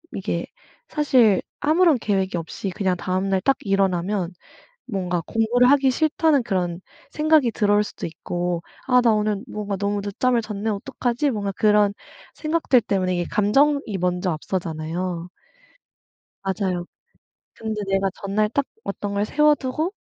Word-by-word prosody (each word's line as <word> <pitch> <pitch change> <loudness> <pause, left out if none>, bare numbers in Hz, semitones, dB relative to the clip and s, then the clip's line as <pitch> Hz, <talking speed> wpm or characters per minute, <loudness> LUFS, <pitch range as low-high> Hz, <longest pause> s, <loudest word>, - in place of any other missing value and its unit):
이게 185 -3 -3 0.4
사실 250 - +4 0.2
아무런 315 -1 +4
계획이 195 -4 0
없이 170 +3 -5
그냥 190 -2 0
다음 185 +2 -1
날 190 -1 +1
딱 270 +7 +2
일어나면 195 -2 0 0.6
뭔가 180 -4 -1
공부를 240 +3 +3
하기 275 -2 +4
싫다는 310 0 +2
그런 180 -4 -2 0.3
생각이 305 -5 +3
들어올 205 0 +2
수도 205 - -6
있고 175 +1 -3 0.2
'아 250 -1 +5
나 230 -2 +4
오늘 210 -1 0
뭔가 205 -3 -4
너무 200 +1 -1
늦잠을 235 +4 +1
잤네? 215 0 -4
어떡하지?' 245 +5 -1
뭔가 200 -3 -2
그런 210 -1 +3 0.4
생각들 305 -6 +2
때문에 185 -3 0
이게 175 - -1
감정이 275 +8 +3 0.2
먼저 180 0 0
앞서잖아요. 170 +1 -3 1.1
맞아요. 190 -2 -1 0.7
근데 220 -1 -4
내가 195 0 +1
전날 210 +2 0
딱 280 +5 0 0.2
어떤 200 0 -4
걸 200 +1 +1
세워두고 300 - +1
205 Hz, 300 characters per minute, -23 LUFS, 185-250 Hz, 1.1 s, 아